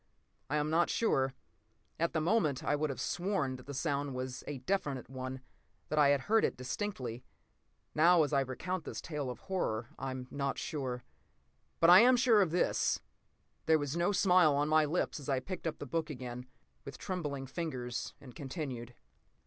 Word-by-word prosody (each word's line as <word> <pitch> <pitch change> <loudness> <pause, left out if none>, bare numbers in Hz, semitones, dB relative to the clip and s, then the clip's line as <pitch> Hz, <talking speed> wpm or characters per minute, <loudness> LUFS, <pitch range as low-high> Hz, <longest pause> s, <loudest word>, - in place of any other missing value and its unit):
I 145 - 0
am 150 +1 0
not 170 +2 +3
sure. 135 - +1 0.6
At 170 0 +1
the 160 - +1
moment, 160 - +1
I 145 - +1
would 155 +1 0
have 135 - -4
sworn 175 -7 -1
that 130 - -14
the 140 - -5
sound 140 -2 -1
was 130 0 -4
a 145 - -4
definite 135 -4 -2
one, 130 0 -5 0.5
that 155 - +1
I 145 - +7
had 140 -1 +3
heard 220 +8 +3
it - - 0
distinctly. 130 - -4 0.7
Now, 170 +1 +6
as 150 - -2
I 140 - +4
recount 165 +7 -3
this - - -6
tale 150 -5 -4
of 125 - -7
horror, 120 - -2
I 135 - -3
am 130 -1 -5
not 140 -1 -2
sure. 130 -5 -3 0.8
But 165 +1 +7
I 180 - +11
am 250 +2 +6
sure 235 -4 +5
of 185 - +2
this: 175 +2 +1 0.7
There 160 0 +6
was 145 0 -3
no 170 +3 +2
smile 180 -6 +5
on 145 +1 +1
my 155 0 +5
lips 155 +1 -1
as 145 - -8
I 135 -2 +2
picked 185 +4 -5
up 160 - -3
the - - -6
book 160 +3 -2
again 125 -2 -6 0.4
with 140 - -8
trembling 150 -8 -4
fingers 130 -4 -4
and 130 -3 -12
continued. 130 -4 -6
145 Hz, 190 wpm, -33 LUFS, 130-170 Hz, 0.8 s, I